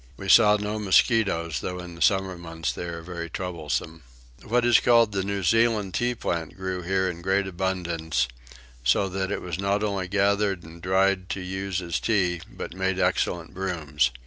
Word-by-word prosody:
We 95 - -6
saw 105 -1 +7
no 105 +1 -3
mosquitoes, 95 - +2
though 90 - -4
in 90 -1 -8
the 85 - -12
summer 95 -2 +2
months 80 -1 -4
they - - -5
are 85 -1 -6
very 85 -1 -6
troublesome. 80 -2 -4 0.4
What 120 +2 +1
is 120 -1 +6
called 115 -3 +4
the 100 -1 -1
New 100 0 -2
Zealand 110 -1 +2
tea 120 +3 0
plant 85 -7 -3
grew 95 -1 -3
here 95 +2 0
in 85 -1 -5
great 95 +2 +1
abundance; 85 -7 -1 0.6
so 65 +11 +3
that 95 +1 -2
it - - -3
was 90 -1 -4
not 100 +1 0
only 100 -3 -1
gathered 100 -1 +1
and 80 +1 -12
dried 95 +1 +2
to - - -3
use 95 0 -3
as 85 -5 -2
tea 90 - +1
but - - -7
made 95 0 -1
excellent 85 -2 0
brooms. 80 -8 0
95 Hz, 180 wpm, -25 LUFS, 85-100 Hz, 0.6 s, saw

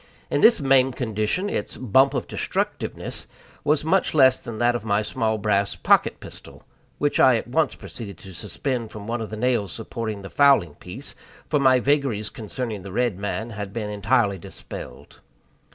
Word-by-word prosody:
In - - +1
this 230 - +7
maimed 135 -2 +3
condition 110 - -1
its 105 - -3
"bump 130 +3 +3
of - - -1
destructiveness" - - -3 0.4
was 150 +1 +2
much 185 0 +2
less 130 -3 +6
than 115 -2 -7
that 120 +1 +2
of 120 - -3
my 105 -1 +1
small 110 -2 -1
brass 100 -1 +1
pocket - - +3
pistol, - - -12 0.3
which - - 0
I - - +7
at - - -2
once - - +1
proceeded 100 -6 -9
to 95 +2 -12
suspend 115 - -3
from 105 -1 -9
one 115 +1 -2
of 110 - -5
the 110 - -6
nails 110 -5 0
supporting 110 -1 -5
the 95 - -9
fowling 140 - +4
piece, 110 - -9 0.3
for 150 - +1
my 130 -2 +5
vagaries 135 -6 0
concerning 110 -1 -5
the 95 +1 -9
red 120 -2 0
man 110 +3 -3
had 100 -2 -6
been 105 -2 -3
entirely 105 -1 +1
dispelled. 60 - -10
115 Hz, 175 wpm, -24 LUFS, 105-130 Hz, 0.4 s, this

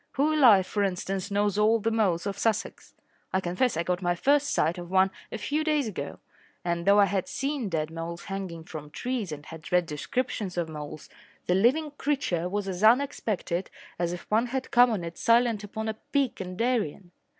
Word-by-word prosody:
Who 295 +3 +2
alive, 230 -11 +6
for 205 - -2
instance, 195 0 -2
knows 205 0 +1
all 220 +2 +5
the 225 +2 0
moles 195 -7 +1
of 200 -1 -2
Sussex? 220 +1 -2 0.4
I 190 - +2
confess 185 +4 0
I 170 - +1
got 180 +1 -1
my 175 -1 +1
first 285 +8 +2
sight 165 +3 +1
of 175 -1 -8
one 190 +1 +4 0.2
a - - -3
few 300 +2 -1
days 300 -5 +1
ago, 145 -9 -5 0.5
and, 170 0 -1
though 200 +1 +6
I 200 - +7
had 195 -2 -1
seen 275 -5 -2
dead 160 -2 -2
moles 165 +1 -6
hanging 190 -4 -5
from 155 -3 -8
trees 240 +1 -3
and 150 -1 -7
had 160 -1 -10
read 180 -1 +3
descriptions 190 - -3
of 170 -2 0
moles, 150 -1 -8 0.4
the 180 - +2
living 260 +11 +3
creature 185 - 0
was 205 +1 -2
as 185 +1 -4
unexpected 215 -7 +2 0.3
as 175 -1 0
if 175 -1 -5
one 225 +3 +3
had 260 +1 -4
come 245 +1 +6
on 210 -6 -2
it 170 0 -7
silent 230 -2 +3
upon 220 +2 -5
a 220 - -1
peak 265 +1 -1
in 185 -1 -6
Darien. 215 -7 -1
200 Hz, 200 wpm, -27 LUFS, 175-235 Hz, 0.5 s, I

